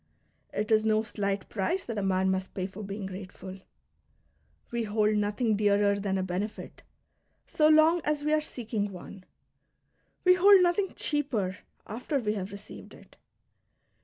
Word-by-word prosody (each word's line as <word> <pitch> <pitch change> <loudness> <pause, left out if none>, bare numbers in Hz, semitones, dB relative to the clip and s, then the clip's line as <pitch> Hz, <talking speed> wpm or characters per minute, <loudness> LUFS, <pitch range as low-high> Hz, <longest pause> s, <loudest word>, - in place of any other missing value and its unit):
It 210 +1 -3
is 215 0 +4
no 220 0 +2
slight 200 -3 -3
price 335 - -1
that 225 -3 -3
a - - -1
man 190 -1 +1
must 190 0 -3
pay 185 - -2
for 190 +2 -8
being 200 0 -5
grate 190 0 -7
ful. 190 0 -10 1.1
We 235 -1 -1
hold 215 0 +1
nothing 210 +2 +1
dearer 205 0 +3
than 195 -1 -1
a 190 - -1
benefit, 190 +4 -5 0.6
so 305 - +2
long 315 +2 +5
as 300 -1 -1
we 300 - 0
ai'e 310 - +3
seeking 220 -8 -4
one; 185 +1 -11 1.0
we 365 - +7
hold 380 +1 +7
nothing 360 +2 +1
cheaper 230 -11 -1 0.3
after 250 +7 -3
we 215 -5 -1
have 195 -2 -5
received 200 +1 -11
it. - - -18
210 Hz, 160 wpm, -28 LUFS, 195-270 Hz, 1.1 s, we